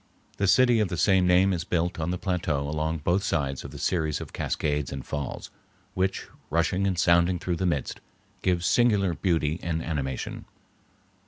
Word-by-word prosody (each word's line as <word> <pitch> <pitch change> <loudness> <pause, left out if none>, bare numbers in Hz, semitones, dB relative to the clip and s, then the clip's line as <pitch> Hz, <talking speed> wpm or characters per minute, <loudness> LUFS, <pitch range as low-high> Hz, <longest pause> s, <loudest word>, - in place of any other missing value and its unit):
The 100 - +1
city 120 +2 +5
of 105 - +2
the 90 - -4
same 95 0 +3
name 95 +2 +4
is 85 -2 -2
built 85 0 -1
on 80 +1 -1
the 90 - -1
plateau 85 -6 -1
along 75 +1 -2
both 90 +5 +2
sides 70 -8 -1
of - - -7
the - - -10
series 80 -4 0
of - - -9
cascades 75 -2 -1
and 70 -1 -6
falls, 75 -3 -5 0.4
which, 95 -1 -1 0.2
rushing 85 +5 +1
and 95 -2 -1
sounding 85 +1 +3
through 90 0 -2
the 95 - 0
midst, 75 -6 -2 0.4
give 90 -2 +1
singular 105 -7 +3
beauty 80 -2 0
and 80 -1 -2
animation. 70 -5 -4
85 Hz, 175 wpm, -26 LUFS, 80-95 Hz, 0.4 s, city